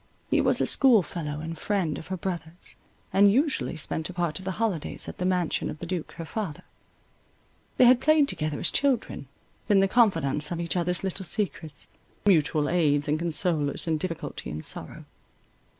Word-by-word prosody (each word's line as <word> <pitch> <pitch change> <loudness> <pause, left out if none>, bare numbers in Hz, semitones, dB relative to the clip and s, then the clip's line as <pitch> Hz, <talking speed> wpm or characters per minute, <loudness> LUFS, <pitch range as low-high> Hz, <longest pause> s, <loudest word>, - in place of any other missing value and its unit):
He - - +4
was - - +2
a - - +2
schoolfellow 170 - +2
and 165 +1 -5
friend 175 -2 -1
of - - -11
her 185 - -3
brother's, 170 -1 -6 0.4
and 200 +1 +6
usually 275 - 0
spent 160 +1 0
a - - -7
part 170 -3 -2
of 190 - -11
the 190 - -2
holidays 210 -9 -2
at - - -8
the 180 - 0
mansion 180 -3 0
of - - -6
the 175 - -7
duke 175 -2 -4
her 165 - -7
father. 170 -2 -5 1.1
They 255 - +6
had 245 +1 +6
played 310 -2 +4
together 155 - -3
as - - +3
children, 265 - 0 0.4
been 205 -2 +4
the 195 - +4
confidants 165 - +2
of 170 - -4
each 170 +1 -2
other's 180 0 -1
little 190 0 -1
secrets, 175 -7 -4 0.4
mutual 155 -5 +3
aids 150 -4 +2
and 150 +1 0
consolers 160 -3 -1
in 160 -2 0
difficulty 165 -1 -5
and 75 +1 -3
sorrow. - - -5
175 Hz, 180 wpm, -26 LUFS, 155-195 Hz, 1.1 s, and